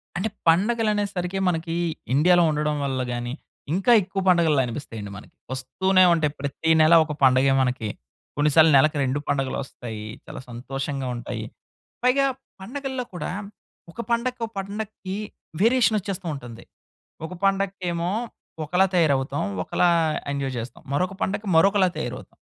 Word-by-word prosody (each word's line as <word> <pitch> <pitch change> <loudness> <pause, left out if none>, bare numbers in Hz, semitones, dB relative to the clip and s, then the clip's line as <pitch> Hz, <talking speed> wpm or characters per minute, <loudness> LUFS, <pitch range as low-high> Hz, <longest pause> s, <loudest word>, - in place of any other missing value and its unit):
అంటే 190 +5 -1 0.2
పండుగలు 215 +7 +3
అనేసరికి 195 -3 -2
మనకి 165 -1 -2 0.4
ఇండియాలో 175 +5 +5
ఉండడం 150 0 0
వల్ల 130 -2 -1
గాని, 120 0 -4 0.4
ఇంకా 195 +6 +2
ఎక్కువ 195 +1 -4
పండుగల్లా 165 -6 +4
అనిపిస్తాయండి 115 -5 -6
మనకి. 105 - -14 0.2
వస్తూనే 185 +9 +2
ఉంటాయి. 155 -3 +1
ప్రతి 140 +3 -2
నెల 155 +2 +6
ఒక 150 - -4
పండుగే 130 +1 +5
మనకి. 125 -4 -1 0.5
కొన్నిసార్లు 150 +2 +5
నెలకి 150 +2 +3
2 135 +2 0
పండుగలు 135 -2 -1
ఒస్తాయి. 110 -5 -8 0.2
చాలా - - -8
సంతోషంగా 135 +3 -4
ఉంటాయి. 120 - -5 0.6
పైగా 265 +2 +4 0.4
పండుగల్లో 265 +4 -4
కూడా 175 -4 -4 0.6
ఒక 235 - -6
పండక్కీ, 240 +1 0
ఒక 225 - -19 0.2
పండక్కీ 205 -2 -6 0.5
వేరియేషన్ 230 0 +4
ఒచ్చేస్తూ 190 -2 -5
ఉంటుంది. 120 -5 -9 0.6
ఒక 170 - -7
పండగకెమో 190 -3 0 0.5
ఒకలా 180 +5 +3
తయారవుతాం, 145 -5 +2 0.2
ఒకలా 180 - +1 0.4
ఎంజాయ్ 140 -2 -2
చేస్తాం. 115 +2 -8
మరొక 185 +6 0
పండక్కీ 205 +2 -2
మరొకలా 195 +3 +5
తయారవుతాం. - - -6
165 Hz, 130 wpm, -24 LUFS, 135-195 Hz, 0.6 s, నెల